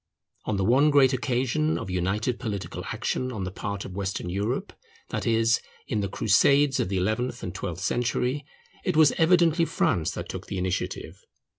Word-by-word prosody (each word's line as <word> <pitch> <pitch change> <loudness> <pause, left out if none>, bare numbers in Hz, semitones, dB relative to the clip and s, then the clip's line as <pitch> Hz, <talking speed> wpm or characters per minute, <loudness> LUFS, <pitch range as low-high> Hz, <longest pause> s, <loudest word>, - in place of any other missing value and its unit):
On 105 - -1
the 95 - 0
one 135 +7 +5
great 140 -2 +5
occasion 130 +5 0
of 95 - -5
united 105 +7 -1
political 105 -6 -4
action 130 0 -2
on 105 -6 -4
the 95 - -4
part 100 +1 -5
of 95 - -8
Western 95 -2 -3
Europe, 105 +7 -2 0.4
that - - -3
is, 115 0 +3 0.3
in 110 - -1
the 100 -1 -1
crusades 135 +8 +3
of - - 0
the 95 - -1
eleventh 110 +6 -1
and 90 - -4
twelfth 85 +3 -5
century, 125 +5 0 0.4
it 180 -4 0
was 155 -2 +7
evidently 170 0 +4
France 90 - +1
that - - -5
took - - -7
the 100 - -4
initiative. 90 0 -3
115 Hz, 175 wpm, -26 LUFS, 95-135 Hz, 0.4 s, was